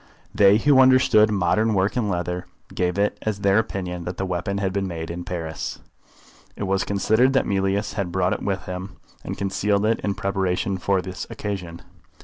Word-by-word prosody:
They 100 0 +6
who 135 +4 +4
understood 130 -5 +5
modern 105 +3 +1
work 95 +1 +1
in 115 -5 0
leather 90 0 -3 0.3
gave 90 +1 -1
it 100 +1 0
as 105 -2 -3
their 100 +1 +4
opinion 90 -5 -4
that 90 0 -5
the 95 - -2
weapon 95 +2 -2
had 95 -2 -1
been 100 -1 -1
made 80 -2 -5
in 85 +1 -5
Paris. 85 -3 -5 0.8
It - - -5
was 95 0 +1
considered 110 +6 +2
that 135 - +2
Mealyus 100 +1 0
had 95 -4 -3
brought 90 0 +1
it - - -4
with 95 -2 -2
him, 90 +2 -6 0.3
and - - -5
concealed 100 +1 0
it 115 +1 +2
in 100 -1 -2
preparation 95 0 -1
for 95 0 +1
this 95 0 -6
occasion. 90 -5 -5
95 Hz, 185 wpm, -23 LUFS, 90-105 Hz, 0.8 s, They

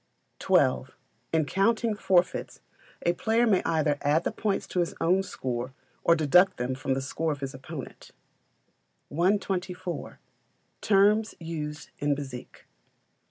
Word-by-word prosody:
xii. - - +3 0.5
In 160 -2 +2
counting 220 +6 +1
forfeits 185 -3 +1 0.5
a 175 - +3
player 225 +6 +2
may 200 -5 +3
either 150 -3 +1
add 150 +4 +2
the - - -1
points 205 -2 -1
to 180 - -3
his 175 - -1
own 185 +3 +3
score 130 -7 -4 0.3
or 170 - +5
deduct 170 +5 +4
them 125 +1 -2
from 130 0 -2
the 135 - -2
score 160 +4 -2
of 145 -1 -5
his 135 -1 -4
opponent. 135 +2 -9 1.0
124. 180 +1 -1 0.6
Terms 210 +2 +3
used 150 -3 -6
in 145 0 +1
Bezique. 135 -3 -8
165 Hz, 130 wpm, -27 LUFS, 145-195 Hz, 1.0 s, or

